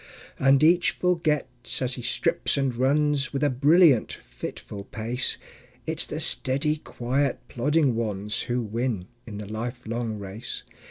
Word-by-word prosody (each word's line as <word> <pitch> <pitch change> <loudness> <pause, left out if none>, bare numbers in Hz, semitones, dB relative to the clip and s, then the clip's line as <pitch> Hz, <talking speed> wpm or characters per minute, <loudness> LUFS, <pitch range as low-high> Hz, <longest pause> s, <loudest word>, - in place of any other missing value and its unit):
And 135 +1 +4
each 170 +2 +5
forgets, 155 -8 -1
as 130 0 -1
he 130 - -5
strips 165 +8 +1
and 135 -3 0
runs 140 +2 +2
With 140 +1 -1
a 145 - +3
brilliant, 145 0 +5
fitful - - -8
pace, 115 +5 -2 0.5
It's - - 0
the - - -4
steady, 140 +4 +3
quiet, 135 -1 -1
plodding 145 +2 +2
ones 105 -2 -2
Who 120 0 0
win 110 -3 -2 0.2
in 105 -3 -7
the 105 - -6
lifelong 115 +1 -4
race. 100 +3 -6
125 Hz, 140 wpm, -26 LUFS, 115-145 Hz, 0.5 s, each